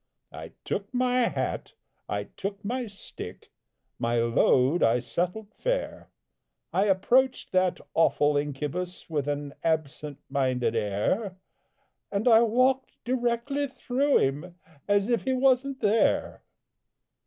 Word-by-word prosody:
I - - -9
took 200 0 -3
my 250 -1 +2
hat, - - -3 0.4
I - - -1
took 200 +1 -7
my 245 +2 -2
stick, 200 -1 -10 0.5
My 115 +1 0
load 125 +6 +3
I 115 +2 +4
settled 180 - -3
fair, - - -3 0.6
I 195 - +3
approached 245 +7 +2
that 185 -1 +2
awful 150 -2 +3
incubus, 150 +5 -3
With 145 -3 -1
an 145 -1 -3
absent 150 -2 -2
minded 130 -4 0
air 115 - -1 0.7
And 200 +4 -1
I 225 -1 +7
walked 255 +3 +2
directly 245 +3 -1
through 270 +2 +1
him, 150 +6 -1 0.3
As 205 0 +2
if 235 -2 +1
he 265 - 0
wasn't 265 +1 +2
there! 215 +2 +2
195 Hz, 120 wpm, -27 LUFS, -, 0.7 s, I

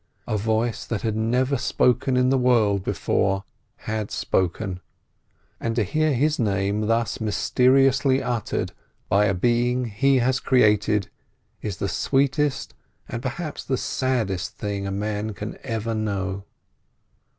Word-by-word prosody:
A - - -2
voice 110 +2 0
that 115 -4 -4
had 110 -2 0
never 125 +4 +1
spoken 125 +2 +2
in 125 +1 +3
the 135 - +3
world 110 -6 +3
before, 95 0 0 0.4
had 110 -2 -2
spoken; 95 +1 -1 0.8
and 115 0 -2
to 115 - +2
hear 155 - +1
his 150 +5 +1
name 100 -1 0
thus 115 +1 0
mysteriously 130 +4 +3
uttered 120 -4 -2 0.4
by 100 +1 +4
a 100 -2 +1
being 120 +5 +1
he 130 +5 +2
has 130 +1 +2
created, 105 -5 +2 0.5
is 100 -4 -4
the 100 - -2
sweetest 140 +5 0 0.3
and 120 - -5
perhaps 150 +5 -4
the 130 - -1
saddest 115 -12 -1
thing 100 -1 -3
a - - -3
man 105 +1 -3
can 105 +2 -6
ever 115 -2 -3
know. 100 -3 -2
115 Hz, 135 wpm, -24 LUFS, 105-130 Hz, 0.8 s, by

